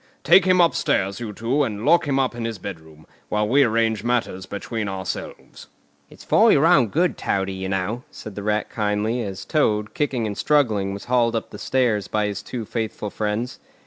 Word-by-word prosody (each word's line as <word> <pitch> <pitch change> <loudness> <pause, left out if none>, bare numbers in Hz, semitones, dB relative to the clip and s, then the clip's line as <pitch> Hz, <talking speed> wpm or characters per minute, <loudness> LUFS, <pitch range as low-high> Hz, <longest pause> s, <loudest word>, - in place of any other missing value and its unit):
Take 190 - +6
him 185 -1 +4
upstairs, 100 - +2
you 115 -3 -5
two, 120 +7 -1
and 105 -3 -3
lock 165 0 +4
him 135 -1 +1
up 130 -2 +1
in 120 -1 -5
his 115 -2 -3
bedroom, 80 -5 -10 0.2
while 105 0 0
we 135 +6 +4
arrange 110 -3 +1
matters 120 -6 -1
between 105 +1 -4
ourselves." 95 -1 -6 0.4
"It's - - -15
for - - +5
your 145 - +4
own 150 -8 +5
good, 170 - 0
Toady, 95 0 -1
you 95 0 -4
know," 95 +5 -2
said 110 - -10
the 100 - -6
Rat 105 +1 0
kindly, 105 +2 -1
as 100 -4 -6
Toad, 105 -9 +1
kicking 130 -6 -1
and 105 -1 -3
struggling, 110 -11 +1
was 100 - -9
hauled 120 -2 +2
up 115 - -3
the 105 - -9
stairs 120 -7 +1
by 105 -1 0
his 105 0 -3
two 115 +1 -6
faithful 110 -2 -4
friends. 110 +3 -3
110 Hz, 195 wpm, -22 LUFS, 100-125 Hz, 0.4 s, Take